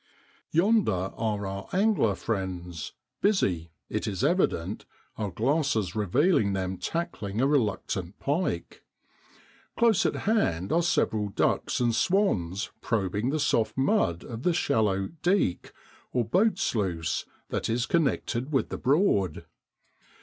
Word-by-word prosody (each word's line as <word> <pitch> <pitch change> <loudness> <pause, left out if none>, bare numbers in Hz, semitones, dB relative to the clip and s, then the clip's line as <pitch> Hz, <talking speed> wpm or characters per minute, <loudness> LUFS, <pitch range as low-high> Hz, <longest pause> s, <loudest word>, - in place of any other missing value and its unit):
Yonder 165 - +2
are 105 -3 -2
our 100 +1 -5
angler 195 - +2
friends, 90 -6 -4 0.3
busy, 95 - +1 0.2
it - - -3
is 95 -3 -2
evident, 105 - +1 0.3
our 105 -2 -3
glasses 115 - 0
revealing 110 - +2
them 95 -1 -2
tackling 105 - -3
a 130 - +3
reluctant 105 - 0
pike. 145 - -2 0.9
Close 225 -4 +4
at - - -2
hand 100 - +1
are 170 - +3
several 110 -11 +1
ducks - - 0
and 120 -2 +2
swans 110 - +1
probing 105 +1 0
the 155 +3 0
soft 115 -6 +1
mud 135 - +1
of 115 -1 -7
the 175 +5 +2
shallow 105 - +1
l - - -5
deek 175 - +1 0.2
' - - -29
or 125 -2 +1
boat 185 - +2
sluice 90 - -1 0.2
that - - -2
is 115 +1 +1
connected 140 -5 0
with 135 - +1
the - - -5
Broad. 130 - +2
115 Hz, 130 wpm, -27 LUFS, -, 0.9 s, Close